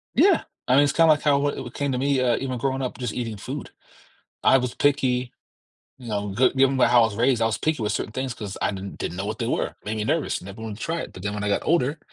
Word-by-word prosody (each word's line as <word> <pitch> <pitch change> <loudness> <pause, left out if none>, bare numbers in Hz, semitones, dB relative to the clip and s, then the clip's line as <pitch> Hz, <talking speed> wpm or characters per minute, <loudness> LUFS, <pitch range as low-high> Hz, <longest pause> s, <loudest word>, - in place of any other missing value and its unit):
Yeah, 375 -3 +5 0.2
I 125 - +4
mean, 140 - +6
it's 145 - +1
kinda 165 -1 +5
like 145 - -3
how 140 -2 +3
wh 145 -2 -2
it 120 - -9
came 140 -1 -1
to 125 - -1
me, 140 +1 +1
uh, 125 -2 +2
even 130 -2 -3
growing 135 +2 -1
up 130 - -4
just 125 -4 -3
eating 115 -3 -4
food. - - -6 0.7
I 135 - +6
was 125 -1 -2
picky, 130 -3 +1 0.7
you 125 -3 -11
know, 100 -1 -2
g 125 +3 +4
given 135 0 +3
by 130 - +5
how 120 -1 +5
I - - +6
was 110 -2 -3
raised, 120 +1 +2
I - - +4
was 115 - 0
picky 155 -5 -1
with 105 - 0
certain - - -3
things 130 +2 -3
'cause 105 -3 -7
I - - +1
didn't 100 0 -7
didn't 90 - -4
know 100 - -3
what 110 +1 -4
they - - -1
were, - - -1
made 110 +1 -3
me 105 - -1
nervous, 110 - -1
never 100 +4 -10
wanted 110 -2 -6
to - - -7
try 165 +1 -2
it. - - -8
But 90 - -10
then 100 0 -2
when 105 0 -4
I 105 - 0
got 100 - 0
older, 155 -2 +1
125 Hz, 290 wpm, -24 LUFS, 105-135 Hz, 0.7 s, mean